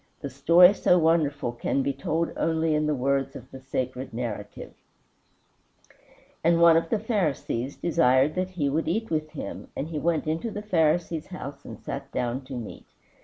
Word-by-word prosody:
The 140 - -5
story 170 +8 +6
so 180 -3 +3
wonderful 155 -6 +1
can 125 +3 -1
be 140 - 0
told 160 +5 -2
only 160 -1 +1
in 150 0 +1
the 150 - +1
words 135 +1 0
of 130 0 -11
the 135 - -9
sacred 130 -1 -4
narrative: 105 -4 -6 1.7
"And 170 +1 +4
one 170 -1 +7
of 165 - +1
the 225 - +1
Pharisees 160 - -2
desired 130 -4 +3
him - - -15
that 185 0 -10
he 150 -5 0
would 155 +4 -1
eat 220 +6 -1
with 155 -1 -2
him, 155 - -7
and 150 - -4
he 155 -2 -3
went 165 0 0
into 160 +9 -2
the 210 -1 -6
Pharisee's 165 -4 +1
house 145 -6 -8
and - - -9
sat - - -6
down 125 +2 -2
to 135 - -9
meat. 120 -3 -8
155 Hz, 180 wpm, -26 LUFS, 135-170 Hz, 1.7 s, one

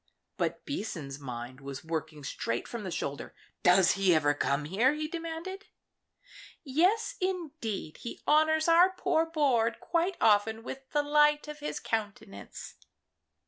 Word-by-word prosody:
But - - -2
Season's 160 - -4
mind 125 0 -7
was 135 0 -7
working 160 -2 -4
straight 120 -3 -3
from 235 -3 -6
the 190 - -4
shoulder. 145 -4 -4 0.3
"Does 180 0 +5
he 190 -3 +3
ever 145 -2 +3
come 140 +1 0
here?" 220 - +2
he 305 0 -3
demanded. 335 +5 -6 1.0
"Yes, 370 - +2
indeed; 305 - -3
he 235 - -7
honours 315 +1 +4
our 340 +3 +7
poor 330 -3 0
board 265 -8 +1
quite 345 +2 0
often 220 +1 +3
with 265 +2 -8
the 295 -1 +1
light 295 0 +3
of 300 0 -7
his 300 - -4
countenance." 210 -2 -5
240 Hz, 140 wpm, -30 LUFS, -, 1.0 s, our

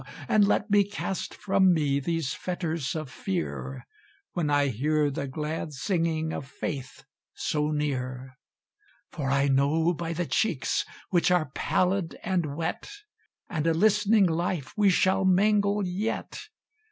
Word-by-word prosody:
And 205 -2 +4
let 210 +1 +1
me 205 0 +6
cast 195 -1 -4
from 190 -3 +3
me 140 -3 +1
these 165 -1 -1
fetters 165 -6 -3
of 155 -4 -4
Fear, 70 - -4 0.5
When 160 -4 -1
I 145 -1 +3
hear 145 +5 +1
the 140 +1 -3
glad 155 +2 -4
singing 160 +1 -1
of 135 - -5
Faith 135 -2 -6 0.3
so 150 0 -1
near; 130 -3 -3 0.8
For 140 -3 -3
I 140 +1 +2
know 145 +5 +2
by 170 0 -4
the 175 +2 -2
cheeks, 155 - 0 0.3
which 180 0 +3
are 170 -6 +2
pallid 185 -2 0
and 175 -6 -1
wet, 160 +1 -3 0.6
And 160 -2 -2
a 165 - +3
listening 210 +2 +4
life 170 -3 -1
we 205 -2 +4
shall 190 +1 +3
mingle 200 +2 +3
yet! 210 - -3
165 Hz, 140 wpm, -27 LUFS, 140-190 Hz, 0.8 s, me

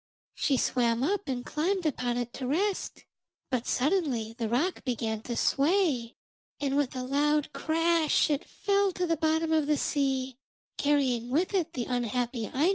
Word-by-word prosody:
She 275 - +1
swam 240 -1 +1
up 405 +5 0
and 250 -2 -3
climbed 360 +4 -1
upon 245 -5 0
it 240 -1 -3
to 260 - -4
rest. 380 +9 -1 0.5
But 250 -2 -1
suddenly 260 - 0
the 230 -2 -2
rock 300 +11 0
began 225 -4 -2
to 240 +1 -4
sway, 285 -6 +2 0.4
and 275 -1 -1
with 280 -2 0
a 255 - -3
loud 295 +3 +1
crash 325 -1 +2
it 290 +3 0
fell 400 -1 +1
to 360 - -1
the 330 -1 +1
bottom 320 +1 +1
of 310 -2 +2
the 300 -1 +2
sea, 265 -3 -1 0.4
carrying 260 -5 +1
with 330 +10 +1
it 345 -4 0
the 245 -5 -2
unhappy 245 -1 -1
Aino. 300 +7 +2
280 Hz, 165 wpm, -29 LUFS, 245-325 Hz, 0.5 s, sway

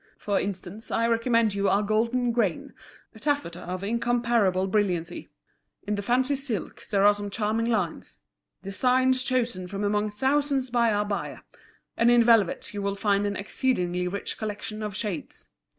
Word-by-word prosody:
"For 205 -1 0
instance, 195 +2 -5
I 230 - +1
recommend 230 -2 +2
you 200 0 +1
our 200 +1 +2
Golden 230 +4 +1
Grain, 225 -8 -1 0.4
a 220 - -14
taffeta 285 - -1
of 185 +1 -5
incomparable 235 -4 +1
brilliancy. 185 -4 -1 0.6
In 210 - -1
the 205 - -1
fancy 255 +6 +1
silks 265 -7 -4
there 200 -1 +3
are 205 - +7
some 205 0 -5
charming 220 +2 -1
lines, 235 -2 -2 0.5
designs 255 +6 +2
chosen 240 -8 -1
from 200 +2 -4
among 210 +1 +1
thousands 265 +3 0
by 235 -2 +3
our 205 0 +1
buyer: 205 -1 -4 0.5
and 230 - +3
in 240 -1 +6
velvets 225 -3 +3
you 205 - -4
will 200 0 -1
find 200 0 +1
an 200 - -2
exceedingly 180 -5 -1
rich 200 +3 -4
collection 215 0 -4
of 210 -2 -4
shades. 205 -7 -5
210 Hz, 160 wpm, -26 LUFS, 200-240 Hz, 0.6 s, are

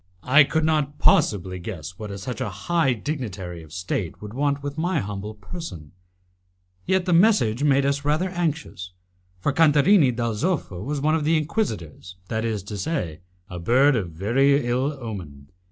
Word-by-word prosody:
I 140 +3 +6
could 160 +2 0
not 150 -2 0
possibly 95 - +2
guess 90 -2 -7
what 100 -2 -6
such 125 +6 -5
a 125 - -1
high 160 - +1
dignitary 105 - -5
of 80 -2 -15
State 90 -1 -3
could 105 0 -9
want 140 +1 0
with 145 0 -4
my 165 +1 0
humble 105 0 -5
person, 100 - -8 1.0
yet 190 -1 +2
the 180 - +1
message 165 - +4
made 140 -2 +3
us 140 0 0
rather 155 +6 +1
anxious, 155 - -3 0.5
for 145 +9 0
Cantarini 155 +1 +5
dal 115 -1 -2
Zoffo 110 - -2
was 145 +2 -3
one 155 +2 +2
of 160 -2 +1
the 160 +2 +3
Inquisitors, 110 - -3
that 110 0 -1
is 110 -4 -2
to 100 0 -6
say, 95 - -3 0.3
a 90 -2 -7
bird 130 +10 +4
of 100 -7 -1
very 125 - +2
ill 125 +4 0
omen. 85 - -8
130 Hz, 170 wpm, -24 LUFS, 95-150 Hz, 1.0 s, I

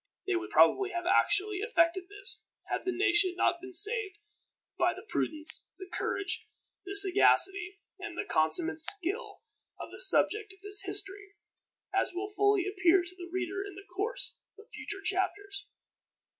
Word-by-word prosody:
They 380 - -1
would 350 +2 -4
probably 395 -1 +4
have 350 -2 -5
actually 395 +2 +1
effected 370 -4 +1
this, 400 -1 -2 0.3
had - - -3
the 375 - 0
nation 360 0 +2
not 345 -1 0
been 375 0 -10
saved 415 +2 +3 0.6
by - - +1
the - - -12
prudence, 310 -6 -2
the 375 - -9
courage, 400 +3 -3 0.4
the 395 - -5
sagacity, 390 -1 +3 0.2
and - - -8
the - - -3
consummate 315 - +1
skill 400 +5 +1 0.4
of - - -8
the - - -9
subject 430 -4 +4
of 385 - -23
this 410 0 +2
history, 405 +1 -2 0.6
as 385 -1 -1
will 400 +3 -5
fully 405 -2 +2
appear 370 -2 +2
to 365 +1 -10
the 350 -1 -10
reader 375 +2 -3
in 405 -1 -10
the 390 - -12
course 430 +6 -4 0.2
of 420 - -16
future 410 -2 -7
chapters. 395 +1 -3
390 Hz, 155 wpm, -29 LUFS, 360-410 Hz, 0.6 s, probably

